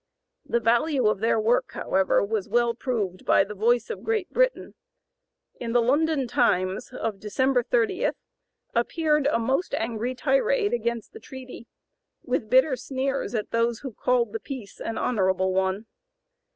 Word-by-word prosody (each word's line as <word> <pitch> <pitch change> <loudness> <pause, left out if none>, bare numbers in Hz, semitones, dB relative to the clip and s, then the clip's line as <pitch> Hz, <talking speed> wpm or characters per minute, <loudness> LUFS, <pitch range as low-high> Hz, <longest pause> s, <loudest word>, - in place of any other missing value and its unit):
The 235 - 0
value 240 +4 +2
of 210 -2 +2
their 225 +1 +2
work, 230 +3 +1
however, 190 +1 +1
was 205 -2 -2
well 235 +1 +2
proved 220 -7 -3
by - - +4
the 205 +2 -7
voice 235 - +1
of - - -6
Great 440 -4 -2
Britain. - - +1 0.9
In 230 -1 -4
the 245 - +5
London 280 +3 +2
"Times" 185 +1 +1
of 225 -5 -4
December 255 +5 +1
30 240 - +1 0.6
appeared 300 +4 +1
a 290 - +2
most 265 +10 0
angry 230 +2 -2
tirade 485 - +1
against 235 - -2
the 445 - -10
treaty, 260 - -10 0.6
with 245 -3 -2
bitter 260 +3 +4
sneers 265 0 -3
at 215 - -3
those 230 0 0
who 265 -4 -6
called 245 +2 +1
the 450 - -2
peace 260 - -8
an 225 - -4
"honorable" 190 -5 +1
one. 190 +3 0
240 Hz, 150 wpm, -25 LUFS, 220-270 Hz, 0.9 s, the